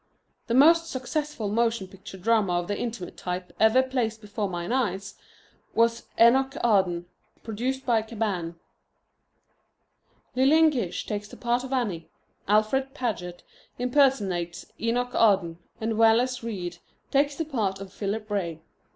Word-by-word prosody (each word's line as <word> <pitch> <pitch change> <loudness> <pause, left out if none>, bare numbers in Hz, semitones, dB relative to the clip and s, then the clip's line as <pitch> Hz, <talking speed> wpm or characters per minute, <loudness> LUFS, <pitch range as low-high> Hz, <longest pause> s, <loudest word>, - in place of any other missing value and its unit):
The 235 - 0
most 330 +5 +6
successful 265 -2 -3
motion 230 -2 0
picture 190 0 -11
drama 210 -1 +2
of 175 0 -1
the 205 - -1
intimate 225 -5 -5
type 180 0 -5
ever 220 +4 +5
placed 245 -4 -2
before 210 -1 -4
mine 175 +1 -4
eyes 200 -6 -1 0.6
was 230 0 +2
Enoch 265 +4 +5
Arden, 190 -6 +2 0.4
produced 250 +5 -3
by 230 -3 +3
Cabanne. 205 -7 -3 1.8
Lillian 310 +5 +5
Gish 195 - -3
takes 210 -1 -4
the - - -12
part 240 +1 0
of 260 - -7
Annie, 210 -11 -2 0.4
Alfred 240 +7 +2
Paget 180 -9 -4 0.3
impersonates 225 -10 +1
Enoch 245 +2 -1
Arden, 190 -6 +3 0.2
and 220 0 -2
Wallace 235 +3 +4
Reid 180 -7 -5 0.3
takes 285 +1 +2
the 325 - -2
part 215 -10 -1
of 195 -1 -9
Philip 210 +1 -3
Ray. 170 -6 -2
225 Hz, 135 wpm, -26 LUFS, 195-255 Hz, 1.8 s, most